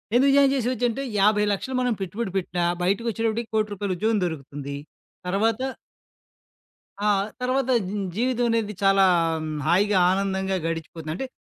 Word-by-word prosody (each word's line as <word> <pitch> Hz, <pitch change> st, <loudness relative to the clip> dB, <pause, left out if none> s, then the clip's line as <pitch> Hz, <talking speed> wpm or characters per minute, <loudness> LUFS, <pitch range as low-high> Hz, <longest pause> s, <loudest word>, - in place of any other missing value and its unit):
ఎందుకు 270 Hz, +3 st, +5 dB
జాయిన్ 275 Hz, -1 st, +5 dB
చేసేవచ్చాంటే, 250 Hz, 0 st, -1 dB, 0.2 s
50,00,000 210 Hz, +1 st, +4 dB
లక్షలు 260 Hz, +6 st, -4 dB
మనం 250 Hz, -1 st, +1 dB
పెట్టుబడి 195 Hz, +3 st, -3 dB
పెట్టినా 175 Hz, -1 st, -2 dB, 0.2 s
బయటికోచ్చేటప్పటికి 225 Hz, +3 st, -1 dB
1,00,00,000 215 Hz, -1 st, +1 dB
రూపాయల 200 Hz, -1 st, -2 dB
ఉద్యోగం 220 Hz, +2 st, +1 dB
దొరుకుతుంది. 140 Hz, -3 st, -5 dB, 0.5 s
తర్వాత 220 Hz, +5 st, +1 dB, 1.4 s
ఆ! 210 Hz, -, 0 dB, 0.4 s
తర్వాత 260 Hz, +1 st, 0 dB, 0.2 s
జ్ -, -, -5 dB, 0.2 s
జీవితమనేది 230 Hz, -3 st, 0 dB
చాలా 195 Hz, 0 st, +5 dB, 0.6 s
హాయిగా 195 Hz, +4 st, +3 dB
ఆనందంగా 190 Hz, 0 st, 0 dB
గడిచిపోతుందంటే, 165 Hz, -, -4 dB
210 Hz, 115 wpm, -24 LUFS, 190-235 Hz, 1.4 s, ఎందుకు